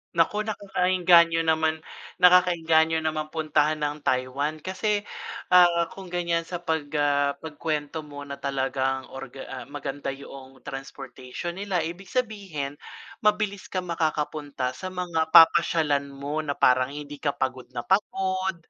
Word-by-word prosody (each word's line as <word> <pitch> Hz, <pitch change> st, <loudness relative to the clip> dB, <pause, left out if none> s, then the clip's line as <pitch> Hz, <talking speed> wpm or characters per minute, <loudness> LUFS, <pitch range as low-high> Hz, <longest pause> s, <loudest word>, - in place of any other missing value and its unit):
Naku, 210 Hz, +6 st, +2 dB
naku, 210 Hz, -1 st, -4 dB
naeengganyo 175 Hz, -2 st, +4 dB
naman 160 Hz, 0 st, +1 dB, 0.4 s
nakakaengganyo 165 Hz, -3 st, +5 dB
naman 155 Hz, -1 st, -1 dB
puntahan 155 Hz, -1 st, +1 dB
ang 150 Hz, +1 st, -2 dB
Taiwan. 140 Hz, +4 st, -1 dB
Kasi, 205 Hz, +2 st, -1 dB, 0.5 s
ah, 175 Hz, -2 st, +5 dB
kung 190 Hz, -1 st, -10 dB
ganIyan 170 Hz, -1 st, -1 dB
sa 175 Hz, -1 st, -6 dB
pag 160 Hz, -3 st, -1 dB
ah, 145 Hz, -1 st, +2 dB
pag-kuwento 155 Hz, -1 st, -4 dB
mo 145 Hz, -2 st, -8 dB
na 140 Hz, 0 st, -8 dB
talagang 135 Hz, -1 st, -1 dB
orga 135 Hz, 0 st, -8 dB
ah, 125 Hz, -2 st, -6 dB
maganda 145 Hz, -1 st, -6 dB
yuong 135 Hz, -1 st, -12 dB
transportation 135 Hz, +5 st, -7 dB
nila, 190 Hz, -5 st, -1 dB
ibig 175 Hz, +4 st, -6 dB
sabihin 195 Hz, -, -3 dB, 0.4 s
mabilis 210 Hz, -2 st, 0 dB
kang 180 Hz, -2 st, -4 dB
makakapunta 150 Hz, -5 st, -2 dB
sa 185 Hz, +8 st, -7 dB
mga 175 Hz, -3 st, -1 dB
papasyalan 155 Hz, -3 st, +6 dB
mo, 140 Hz, +2 st, -4 dB
na 150 Hz, -2 st, -2 dB
parang 130 Hz, +2 st, +3 dB
hindi 145 Hz, -1 st, -8 dB
ka 145 Hz, -2 st, -1 dB
pagod 130 Hz, -1 st, -3 dB
na 120 Hz, -, -3 dB
pagod, 190 Hz, -1 st, 0 dB
155 Hz, 135 wpm, -26 LUFS, 140-175 Hz, 0.5 s, papasyalan